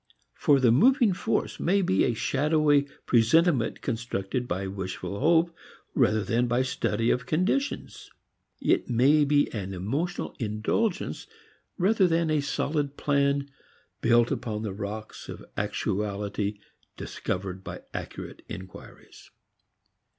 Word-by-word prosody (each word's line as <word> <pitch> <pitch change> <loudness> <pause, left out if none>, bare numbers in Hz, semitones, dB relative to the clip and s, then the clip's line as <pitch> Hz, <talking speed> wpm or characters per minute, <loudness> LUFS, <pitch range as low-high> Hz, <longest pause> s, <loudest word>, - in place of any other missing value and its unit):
For 140 -2 +3
the 125 -3 +4
moving 240 - +5
force - - -1
may 195 +3 +2
be 95 - +2
a 120 - 0
shadowy 145 +2 +2 0.2
presentiment 125 +2 +3
constructed 120 -1 -3
by 95 0 -2
wishful 95 +1 -5
hope 165 +1 +3 0.4
rather 110 -1 +3
than 120 +2 +1
by 120 +2 +2
study 115 -3 0
of 125 0 -1
conditions; 190 - -1 0.5
it - - +1
may 140 +5 +4
be 145 0 +2
an 95 -3 -4
emotional 135 - -2
indulgence 115 - -1 0.5
rather 195 +1 +3
than 165 -1 +1
a 155 -1 +2
solid 145 0 -2
plan 140 -1 +1 0.5
built 120 0 +4
upon 110 -3 -3
the 105 -3 -3
rocks 105 +2 -7
of - - -8
actuality 100 0 -2 0.4
discovered 95 0 -4
by - - -7
accurate - - -7
inquiries. 95 +1 -11
125 Hz, 120 wpm, -27 LUFS, 105-155 Hz, 0.5 s, moving